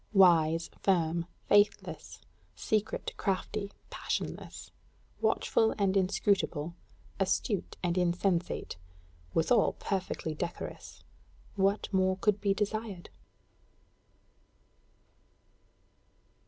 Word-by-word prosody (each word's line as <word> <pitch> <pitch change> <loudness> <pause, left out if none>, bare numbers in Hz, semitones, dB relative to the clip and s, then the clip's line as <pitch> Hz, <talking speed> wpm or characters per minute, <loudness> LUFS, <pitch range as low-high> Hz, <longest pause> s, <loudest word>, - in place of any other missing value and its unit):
Wise, 165 -4 +5
firm, 170 -3 +1 0.2
faithless, 205 0 +2 0.3
secret, 215 -1 -1
crafty, 200 +1 -2 0.2
passionless; - - -4 0.5
watchful 220 -1 +2
and 195 -2 +2
inscrutable; 185 -4 +1 0.5
acute 195 +1 0
and 175 0 +1
insensate 175 - 0 0.6
withal 210 +7 +3
perfectly 185 -4 -3
decorous 170 +3 -6 0.5
what 195 +1 +2
more 190 0 +3
could 205 +1 +1
be 200 - +2
desired? 210 -2 -2
190 Hz, 75 wpm, -31 LUFS, 175-205 Hz, 0.6 s, Wise